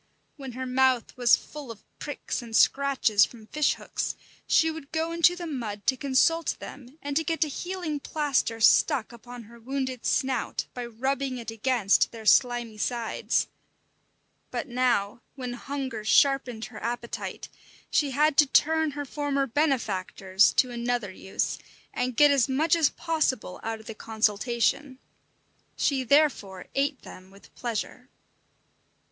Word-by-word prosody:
When 270 Hz, -4 st, -8 dB
her 260 Hz, +2 st, -5 dB
mouth 255 Hz, -1 st, +1 dB
was 245 Hz, -1 st, +5 dB
full 295 Hz, -4 st, -10 dB
of 225 Hz, -2 st, -10 dB, 0.2 s
pricks 290 Hz, -2 st, -4 dB
and 230 Hz, -2 st, -7 dB
scratches 270 Hz, -8 st, +4 dB
from 225 Hz, -1 st, -4 dB
fish 300 Hz, +6 st, +1 dB
hooks, -, -, -4 dB, 0.3 s
she 320 Hz, 0 st, +4 dB
would 315 Hz, -3 st, -10 dB
go 325 Hz, +1 st, -1 dB
into 335 Hz, +1 st, +4 dB
the 350 Hz, -1 st, -6 dB
mud 230 Hz, -9 st, -5 dB
to 260 Hz, -, +3 dB
consult 285 Hz, +4 st, +2 dB
them 265 Hz, +1 st, -11 dB
and 285 Hz, 0 st, -3 dB
to 320 Hz, -, +2 dB
get 325 Hz, +1 st, 0 dB
a -, -, -2 dB
healing 350 Hz, 0 st, -4 dB
plaster 280 Hz, -6 st, -1 dB
stuck 220 Hz, +1 st, +4 dB
upon 240 Hz, +1 st, -11 dB
her 235 Hz, +2 st, -15 dB
wounded 260 Hz, 0 st, -4 dB
snout 260 Hz, -2 st, 0 dB
by 245 Hz, -1 st, -5 dB
rubbing 265 Hz, +3 st, -2 dB
it 230 Hz, -2 st, -6 dB
against 225 Hz, -2 st, +2 dB
their 225 Hz, -2 st, -10 dB
slimy 240 Hz, -2 st, +3 dB
sides; 235 Hz, 0 st, -1 dB, 1.0 s
but -, -, -4 dB
now, 240 Hz, -4 st, 0 dB
when 250 Hz, -3 st, -5 dB
hunger 260 Hz, -3 st, -5 dB
sharpened 255 Hz, -1 st, +2 dB
her 225 Hz, -, -10 dB
appetite, 235 Hz, 0 st, -5 dB, 0.4 s
she 290 Hz, -, +2 dB
had 295 Hz, +2 st, +2 dB
to 295 Hz, -, +6 dB
turn 320 Hz, +3 st, +3 dB
her 290 Hz, -, -3 dB
former 280 Hz, 0 st, -1 dB
benefactors 210 Hz, -8 st, +1 dB
to 255 Hz, -, +2 dB
another 240 Hz, -3 st, -2 dB
use, 190 Hz, +1 st, -3 dB, 0.3 s
and 250 Hz, -1 st, -2 dB
get 295 Hz, -1 st, +7 dB
as 275 Hz, -1 st, +3 dB
much 310 Hz, +6 st, +2 dB
as 325 Hz, -4 st, +3 dB
possible 310 Hz, -, -1 dB
out 225 Hz, 0 st, -4 dB
of 220 Hz, -, -15 dB
the 225 Hz, -, -6 dB
consultation. 235 Hz, +5 st, 0 dB, 0.8 s
She 270 Hz, -2 st, +1 dB
therefore 250 Hz, -9 st, +2 dB
ate 275 Hz, 0 st, -1 dB
them 185 Hz, +1 st, -12 dB
with 195 Hz, +1 st, -18 dB
pleasure. 245 Hz, +2 st, -5 dB
255 Hz, 150 wpm, -27 LUFS, 230-285 Hz, 1.0 s, get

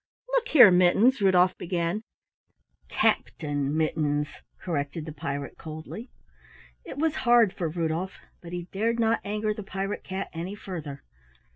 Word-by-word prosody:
"Look -, -, +1 dB
here, 245 Hz, -10 st, +8 dB
Mittens," 195 Hz, +8 st, +4 dB
Rudolf 185 Hz, -2 st, +4 dB
began. 175 Hz, +3 st, -1 dB, 0.9 s
"Captain 145 Hz, -1 st, 0 dB
Mittens," 150 Hz, -2 st, +1 dB, 0.3 s
corrected 150 Hz, -3 st, -3 dB
the 160 Hz, -, -6 dB
pirate 145 Hz, -2 st, -5 dB
coldly. 160 Hz, -, -8 dB, 0.7 s
It -, -, -9 dB
was 315 Hz, +1 st, 0 dB
hard 240 Hz, -5 st, +4 dB
for 175 Hz, -4 st, -2 dB
Rudolf, 170 Hz, +3 st, -2 dB, 0.3 s
but 170 Hz, -, -10 dB
he 175 Hz, 0 st, -4 dB
dared 230 Hz, +4 st, 0 dB
not 230 Hz, 0 st, +2 dB
anger 210 Hz, +1 st, -1 dB
the 210 Hz, -, -7 dB
pirate 195 Hz, 0 st, -4 dB
cat 190 Hz, +1 st, -5 dB
any 175 Hz, +4 st, -5 dB
further. 160 Hz, -9 st, -7 dB
180 Hz, 135 wpm, -27 LUFS, 160-210 Hz, 0.9 s, here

